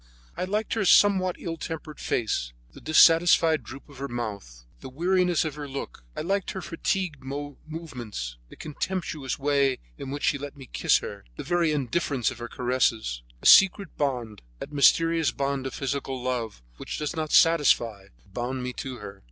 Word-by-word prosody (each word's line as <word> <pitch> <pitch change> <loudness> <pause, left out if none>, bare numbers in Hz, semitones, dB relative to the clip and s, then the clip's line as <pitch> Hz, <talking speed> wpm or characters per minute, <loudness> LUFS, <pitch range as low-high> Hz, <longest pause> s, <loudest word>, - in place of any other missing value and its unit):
I - - -2
liked 210 +3 -1
her 220 - 0
somewhat 190 -1 +5
ill 165 -1 -5
tempered 155 -1 -7
face, - - -1 0.2
the - - -13
dissatisfied 165 0 +5
droop 135 +1 -11
of 140 -3 -14
her 140 - -3
mouth, 100 - -6
the - - -9
weariness 175 +4 +1
of 155 - -3
her 145 0 -7
look; 135 - -7
I - - -1
liked 195 +4 -1
her 190 - -5
fatigued 170 -3 -2
movements, 140 - -7
the - - -13
contemptuous 155 -3 -4
way 140 -2 +2 0.2
in 135 - -6
which 145 +1 -5
she 140 - +2
let 145 0 -7
me 135 - -10
kiss - - +3
her, - - -8
the - - -6
very 175 -2 +1
indifference 140 -3 0
of 125 - -10
her 120 - -5
caresses. 115 - 0 0.2
A - - -10
secret 195 +1 +6
bond, 120 -7 -2 0.2
that 140 - -8
mysterious 165 +3 +4
bond 140 -1 -2
of - - -7
physical 135 -1 -3
love, 120 - -3
which - - -6
does 150 +3 -3
not 155 -1 -3
satisfy, 120 -11 +4 0.2
bound 125 +6 -4
me 125 0 -4
to 130 0 -6
her. 100 -3 -10
140 Hz, 175 wpm, -26 LUFS, 125-165 Hz, 0.2 s, secret